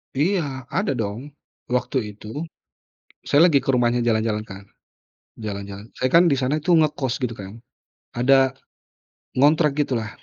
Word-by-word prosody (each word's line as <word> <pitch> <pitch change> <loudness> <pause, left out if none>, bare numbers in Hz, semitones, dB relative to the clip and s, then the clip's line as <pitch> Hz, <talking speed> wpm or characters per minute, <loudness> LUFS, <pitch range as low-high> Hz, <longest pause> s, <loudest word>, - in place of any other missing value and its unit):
Iya 145 -4 0
ada 195 0 0
dong. 105 0 -3 0.5
Waktu 125 +2 -1 0.2
itu 110 +11 -7 0.8
saya 145 - +4
lagi 145 - +5
ke - - +1
rumahnya 120 0 +2
jalan-jalan, 110 -2 0
Kak, 100 -1 -11 0.7
jalan-jalan. 100 0 -6
Saya 130 - +1
kan 170 +1 +7
di 140 - +3
sana 130 +2 0
tuh 170 -1 +4
ngekos 145 -5 0
gitu 120 -2 -1
kan. 100 +1 -10 0.6
Ada 135 +2 +3 0.8
ngontrak 150 +2 +4
gitulah, 125 -7 -1
125 Hz, 135 wpm, -22 LUFS, 110-145 Hz, 0.8 s, kan